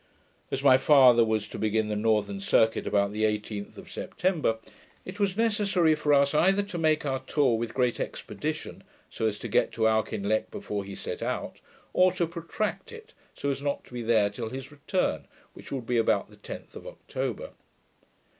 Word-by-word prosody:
As 135 - -3
my 130 -2 +7
father 130 -4 +7
was 110 -2 0
to - - -7
begin 110 0 +1
the 105 - -2
northern 105 -2 +1
circuit 110 +3 +2
about 100 -1 +2
the 110 +1 -1
18th 105 -1 -2
of - - -11
September, 165 -11 -1 0.5
it 185 +3 -8
was 200 -1 0
necessary 205 -7 +3
for 150 -1 0
us 140 0 +5
to 195 +4 +2
make 155 -2 +2
our 135 -2 -1
tour 135 -6 +3
with 115 0 -4
great 125 -2 +1
expedition, - - -5 0.3
so 110 - -1
as 105 -1 -2
to - - -6
get - - +2
to 110 -1 +2
Auchinleck 110 -1 0
before 105 -1 -4
he 100 0 -8
set - - -5
out, - - -3 0.4
or 185 0 +5
to 170 - 0
protract 170 - -4
it, 460 +1 -12 0.2
so 140 - -1
as 135 0 -4
not 140 0 -2
to - - -18
be 120 - -4
there 110 -3 +3
till 110 +2 -5
his 130 +4 -7
return, 140 - -2 0.3
which - - -12
would 130 -4 -4
be 120 +1 0
about 115 - +1
the - - -16
10th - - -9
of - - -9
October. - - -5
130 Hz, 185 wpm, -27 LUFS, 110-165 Hz, 0.5 s, my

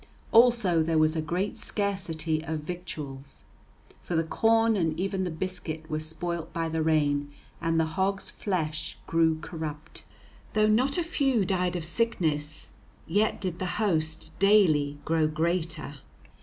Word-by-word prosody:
Also 230 -8 +5
there 160 0 +1
was 155 +1 +3
a 160 - 0
great 180 +6 -2
scarcity 170 -6 -1
of 160 -1 -3
victuals; 150 -6 -7 0.6
for 175 - -4
the 165 - +3
corn 225 +6 +3
and 165 -4 0
even 195 0 -1
the - - -2
biscuit 160 -2 -4
were 155 - 0
spoilt 165 +1 -4
by 165 -1 -2
the 160 0 -1
rain, 145 -2 +1 0.3
and 165 0 +1
the 160 - +3
hogs' 190 +4 -1
flesh 155 -6 -3
grew 165 -1 +2
corrupt. 155 -3 -7 0.5
Though 215 0 +4
not 255 +8 +3
a 350 - +2
few 270 - +1
died 180 -1 0
of 170 -3 -2
sickness, 160 -7 -1 0.3
yet 205 +6 +1
did 180 -3 -4
the 185 - -2
host 160 -6 0
daily 165 -8 +4
grow 160 -1 +2
greater. 160 -2 -2
165 Hz, 145 wpm, -28 LUFS, 155-195 Hz, 0.6 s, Also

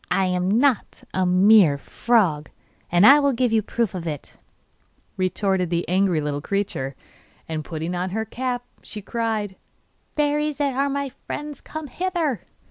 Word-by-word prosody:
'I 190 +1 +2
am 180 0 0
not 270 -5 +1
a 185 -1 +1
"mere 185 -4 +6
frog," 175 - +1 0.4
and 175 +3 +5
I 280 +4 +9
will 280 -1 +2
give 245 -1 +1
you 220 - +4
proof 230 0 -2
of 175 -2 -5
it,' 150 -3 -6 0.8
retorted 185 -1 0
the 170 0 -1
angry 185 -2 +2
little 145 -1 -2
creature. 150 -8 -2 0.5
And 155 -1 -3
putting 160 +3 -4
on 180 +1 -2
her 220 +4 -2
cap, 245 +2 -3 0.2
she 210 -2 -8
cried: 215 -4 -2 0.6
Fairies 295 0 0
that 280 -2 0
are 275 +2 +1
my 280 0 -2 0.2
friends, 295 -2 -5
come 315 -1 -7
hither! 330 - -2
205 Hz, 155 wpm, -23 LUFS, 180-265 Hz, 0.8 s, I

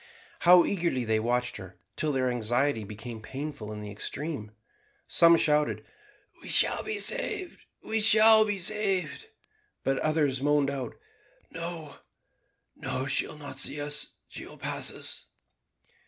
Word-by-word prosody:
How 175 0 +6
eagerly 170 -10 -1
they 110 0 +1
watched 125 +2 -1
her, 95 -1 -11 0.2
till 155 - -1
their 130 -2 0
anxiety 120 +1 0
became 110 +2 -8
painful 135 -3 -7
in 105 0 -7
the 105 -1 -8
extreme. 125 +2 -5 0.6
Some 170 0 +5
shouted, 150 -1 +1 0.6
"We - - -9
shall - - +4
be 430 0 -4
saved, 415 -4 -1 0.2
we 220 0 -1
shall 220 0 +7
be 205 -2 -1
saved;" 195 - 0 0.6
but 135 0 0
others 150 -4 0
moaned 145 -1 +2
out, 130 -4 -5 0.6
"No, 165 -2 -7 0.8
no, 130 - -3
she'll 135 +3 0
not 145 -1 -9
see 145 - +2
us, 145 0 0
she - - -9
will - - -12
pass - - +1
us." - - -4
145 Hz, 140 wpm, -28 LUFS, 125-175 Hz, 0.8 s, shall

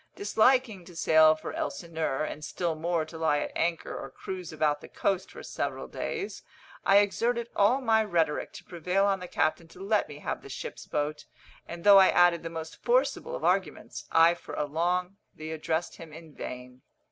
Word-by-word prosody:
Disliking 250 - +2
to 175 - -13
sail 155 -1 +5
for 155 - -7
Elsineur, 155 0 -3
and 155 0 -5
still 170 +1 -2
more 165 0 -1
to 160 +1 -10
lie 160 -2 +2
at - - -3
anchor 170 -1 -1
or - - -6
cruise 185 -3 -7
about 150 -1 0
the - - -10
coast 190 -1 -1
for - - -11
several - - -4
days, 420 -3 -5 0.4
I 195 - +5
exerted 235 +4 +1
all 230 +7 +3
my 220 -3 +3
rhetoric 165 -7 0
to - - -10
prevail 180 +3 0
on 195 -1 +1
the 180 - -7
captain 165 0 0
to 165 - -16
let 200 -2 0
me 145 - -9
have - - -4
the - - -12
ship's 135 - -7
boat, 150 +1 -2 0.4
and 170 0 -8
though 200 -1 +9
I 190 - +7
added 175 -2 +4
the 165 - -5
most 160 -1 -8
forcible - - +1
of - - -7
arguments, - - -1
I 165 +1 +6
for 175 - -9
a 150 - -1
long 180 +5 -1 0.2
time 155 0 -6
addressed 160 +1 -2
him 165 -2 -11
in 160 0 -12
vain. 125 -1 -8
170 Hz, 195 wpm, -28 LUFS, 155-195 Hz, 0.4 s, though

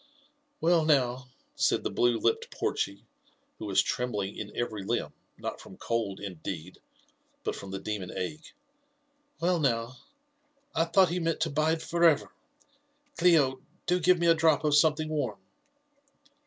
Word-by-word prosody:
•* - - -30 0.6
Well, 170 -1 +3
now 135 -6 +3
1" 130 +1 -10 0.3
said - - +2
the - - -2
blue 120 -1 +2
lipped 115 0 0
Porchy, 100 0 -2 0.6
who - - -5
was - - +3
trembling 105 -5 -2
in 105 0 -6
every 110 -4 -2
limb, - - -2 0.2
not - - -5
from 95 - -13
cold 115 -4 -2
indeed, 90 -2 -7 0.6
but - - -2
from 100 - -8
the 95 - -4
demon 100 -3 -4
ague 150 - -6 0.3
— 290 0 -44
" 290 0 -43
well, 175 0 +2
now! 120 -3 0 0.8
I 165 - +2
thought 180 +1 +4
ho 180 - 0
meant 165 -1 -1
to 160 - +1
bide 155 +2 +1
for 170 0 -1
ever. 160 -4 +4 0.9
Clio, 150 -7 +4 0.2
do 180 +1 +2
give 180 +1 +4
me 170 - 0
a 165 - +7
drop 160 -2 +3
of 150 -1 +2
something 155 +1 +4
warm." 155 -1 -2
150 Hz, 165 wpm, -29 LUFS, 115-165 Hz, 0.9 s, a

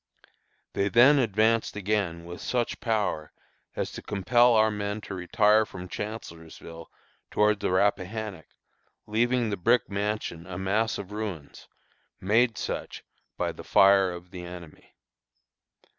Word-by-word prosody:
They 100 - 0
then 130 +7 +6
advanced 110 -1 +1
again 100 -5 -2
with 85 0 -9
such 120 -2 -2
power 100 -9 -1 0.4
as - - -3
to - - -8
compel 120 +5 +3
our 110 0 +4
men 105 0 -3
to 100 - -8
retire 105 +4 +3
from 95 -3 -9
Chancellorsville 85 -5 -8 0.4
toward 105 -1 +2
the - - -1
Rappahannock, 100 0 -1 0.6
leaving 120 +1 +1
the 100 - -2
brick 115 +5 +2
mansion 100 -4 -3
a 90 -1 -6
mass 105 +4 0
of 100 0 -8
ruins, 100 -9 -6 0.5
made 110 +4 +2
such - - -5 0.3
by - - -1
the - - -11
fire 95 -1 +5
of 90 +1 -10
the 90 -1 -8
enemy. 85 -3 -11
105 Hz, 130 wpm, -27 LUFS, 90-110 Hz, 0.6 s, then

